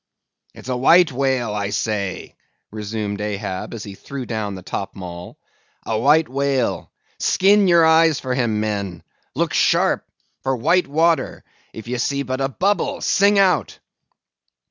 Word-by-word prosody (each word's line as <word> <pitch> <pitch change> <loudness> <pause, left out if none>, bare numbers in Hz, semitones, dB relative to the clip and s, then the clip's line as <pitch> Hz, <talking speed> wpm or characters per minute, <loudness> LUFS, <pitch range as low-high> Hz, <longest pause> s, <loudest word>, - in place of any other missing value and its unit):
"It's - - -12
a 130 - -1
white 165 +7 +5
whale, 130 -4 -1
I 100 -1 -2
say," 100 -2 -3 0.4
resumed 105 -1 -4
Ahab, 100 -2 -4
as 110 - -7
he 100 - -8
threw 130 +6 -7
down 110 -4 -4
the 95 - -10
topmaul: 90 -2 -7 0.5
"a 110 -1 -1
white 150 +6 +4
whale. 135 -1 -1 0.3
Skin 200 +1 +3
your 170 -2 +5
eyes 160 -1 +4
for 130 -1 -3
him, 120 -4 0
men; 100 -5 -3 0.3
look - - -1
sharp - - +2 0.4
for 135 0 -1
white 170 +9 +2
water; 165 +3 +1 0.3
if 110 0 -10
ye 125 0 -3
see 140 +3 -1
but 130 +1 -4
a 135 - 0
bubble, 205 - 0
sing 200 +1 +3
out." 195 -2 +2
125 Hz, 145 wpm, -20 LUFS, 105-160 Hz, 0.5 s, white